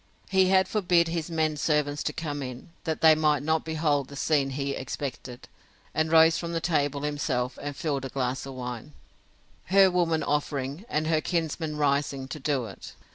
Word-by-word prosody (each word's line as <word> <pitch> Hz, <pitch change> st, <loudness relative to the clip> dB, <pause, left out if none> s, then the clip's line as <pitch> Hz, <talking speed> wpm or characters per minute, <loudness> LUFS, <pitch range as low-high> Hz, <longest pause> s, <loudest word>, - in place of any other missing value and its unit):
He 190 Hz, -1 st, +4 dB
had 190 Hz, 0 st, +4 dB
forbid 175 Hz, -5 st, +2 dB
his 165 Hz, 0 st, -3 dB
men 155 Hz, -2 st, 0 dB
servants 145 Hz, -1 st, 0 dB
to -, -, 0 dB
come 145 Hz, -3 st, -4 dB
in, 125 Hz, +4 st, -7 dB, 0.2 s
that 160 Hz, -2 st, -2 dB
they 160 Hz, -1 st, +8 dB
might 150 Hz, -2 st, +2 dB
not 160 Hz, +1 st, +1 dB
behold 150 Hz, -4 st, 0 dB
the 140 Hz, -, -10 dB
scene 140 Hz, -1 st, +1 dB
he 140 Hz, +1 st, -2 dB
expected; 130 Hz, -2 st, -6 dB, 0.5 s
and 155 Hz, 0 st, 0 dB
rose 160 Hz, 0 st, +6 dB
from 170 Hz, -1 st, -2 dB
table 145 Hz, -4 st, 0 dB
himself, 140 Hz, -4 st, -2 dB
and 145 Hz, 0 st, -5 dB
filled 140 Hz, -3 st, -2 dB
a -, -, -4 dB
glass 130 Hz, 0 st, -2 dB
of 135 Hz, -, -8 dB
wine, 125 Hz, +2 st, -6 dB, 0.7 s
her 190 Hz, +1 st, +5 dB
woman 170 Hz, -3 st, +1 dB
offering, 145 Hz, +3 st, -2 dB
and 155 Hz, +1 st, 0 dB
her 155 Hz, -1 st, +2 dB
kinsman 160 Hz, -2 st, -2 dB
rising, 140 Hz, -2 st, 0 dB
to 155 Hz, -, -6 dB
do 135 Hz, -3 st, 0 dB
it. 100 Hz, -, -10 dB
150 Hz, 180 wpm, -27 LUFS, 140-160 Hz, 0.7 s, they